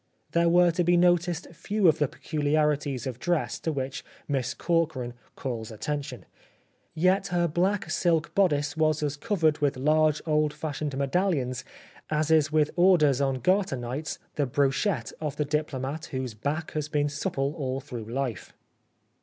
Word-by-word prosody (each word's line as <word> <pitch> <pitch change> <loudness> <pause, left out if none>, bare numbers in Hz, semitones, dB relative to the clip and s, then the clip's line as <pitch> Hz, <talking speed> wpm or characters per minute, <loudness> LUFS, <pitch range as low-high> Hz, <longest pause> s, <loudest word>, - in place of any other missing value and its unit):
There 170 +1 +3
were 175 0 +5
to 175 +1 0
be 175 +1 +4
noticed 175 -1 +2
few 205 +4 +1
of 160 -1 +4
the 150 - +3
peculiarities 145 -3 0
of 125 -2 -5
dress 175 +1 -1
to 160 - -2
which 135 -2 -4 0.2
Miss 135 -4 -1
Corkran 160 -8 0 0.2
calls 115 -5 -4
attention. 130 0 -5 0.7
Yet 185 +4 +2
her 175 -2 +1
black 185 +5 0
silk 170 -2 +1
bodice 150 -5 +2
was 155 -1 +1
as 145 -1 -1
covered 160 -4 +1
with 145 -3 +1
large 155 +2 +3
old 150 -1 +2
fashioned 145 -2 -4
medallions 135 -4 0 0.5
as 155 0 0
is 155 -2 +4
with 150 -1 +2
orders 165 -7 +4
on 135 -2 0
Garter 185 - +2
nights 125 +5 -4 0.2
the 145 -2 +1
brochette 135 - 0
of 150 -3 -3
the 150 - -1
diplomat 150 0 -2
whose 130 -3 -4
back 145 +9 -3
has 150 -1 -3
been 145 -1 +1
supple 140 -1 -2
all 135 -5 -3
through 125 -5 -7
life. 120 -1 -4
150 Hz, 155 wpm, -27 LUFS, 135-165 Hz, 0.7 s, were